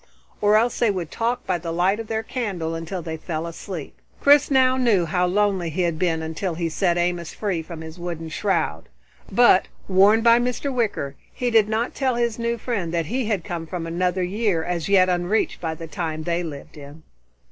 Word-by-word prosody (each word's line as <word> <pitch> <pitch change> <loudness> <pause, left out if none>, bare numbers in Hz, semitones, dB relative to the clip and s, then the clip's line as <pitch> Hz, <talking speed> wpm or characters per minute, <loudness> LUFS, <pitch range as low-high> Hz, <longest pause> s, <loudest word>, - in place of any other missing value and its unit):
Or 210 0 +4
else 235 +2 +1
they 235 - +3
would 180 -5 -3
talk 240 +2 -1
by 185 -3 0
the 165 0 -5
light 185 +5 +1
of 225 - -5
their 220 0 -2
candle 195 -10 -3
until 165 +2 -5
they 160 0 -4
fell 160 0 -4
asleep. 170 -1 -7 0.3
Chris 285 0 +5
now 260 -2 +4
knew 230 -9 +3
how 180 +2 +1
lonely 190 -2 +1
he 180 +4 -1
had 170 -2 -1
been 165 -3 0
until 160 +2 -3
he 170 0 -1
set 175 +1 +1
Amos 175 -1 -1
free 195 -6 -1
from 160 0 -9
his 160 +2 -9
wooden 170 -2 -5
shroud, 195 +4 -1 0.4
but, 240 -6 +5 0.2
warned 200 +4 +5
by 235 0 +6
Mr. 250 +3 -2
Wicker, 205 - -1 0.2
he 245 -1 -2
did 220 -2 +4
not 225 +3 -1
tell 260 -3 0
his 235 -1 -1
new 235 0 -1
friend 210 -9 -3
that 165 -1 0
he 240 +6 -2
came 165 -1 -5
from 175 -1 -4
another 180 +2 0
year 190 -2 0
as 175 0 -3
yet 190 -2 +5
unreached 180 +4 0
by 160 -2 -2
the 165 - -8
time 155 0 -4
they 170 +1 -1
lived 150 -3 -8
in. 145 +2 -12
180 Hz, 200 wpm, -23 LUFS, 165-220 Hz, 0.4 s, by